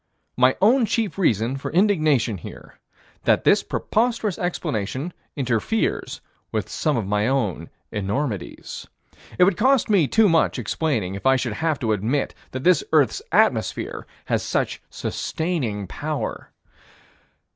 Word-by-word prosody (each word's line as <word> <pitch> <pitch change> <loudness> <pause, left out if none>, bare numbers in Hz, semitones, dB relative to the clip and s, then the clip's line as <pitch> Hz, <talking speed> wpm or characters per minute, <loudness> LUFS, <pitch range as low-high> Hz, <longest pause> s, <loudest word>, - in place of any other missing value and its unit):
My 130 +1 +4
own 235 +2 +5
chief 215 -3 -1
reason 120 - +1
for 135 - -5
indignation 155 - +2
here: - - -11 0.5
That - - +3
this - - +5
preposterous 225 -4 -1
explanation 140 - -2 0.2
interferes 130 - -1 0.3
with - - -2
some 155 -4 0
of 110 - -1
my 105 +2 +1
own 125 - -1 0.2
enormities. 105 - -4 0.5
It 180 - +6
would 185 -1 +3
cost 255 0 +3
me 180 -8 +4
too 220 +6 +4
much 165 -3 +2
explaining, 115 - -1
if 100 +6 -3
I 135 - +6
should 125 -3 -1
have 160 +5 0
to 110 -3 +1
admit 115 +8 -1 0.2
that 130 0 -6
this 180 - +4
earth's - - +3
atmosphere - - +1 0.2
has - - 0
such - - -1
sustaining 140 - -3
power. - - -4
140 Hz, 135 wpm, -23 LUFS, 110-180 Hz, 0.5 s, It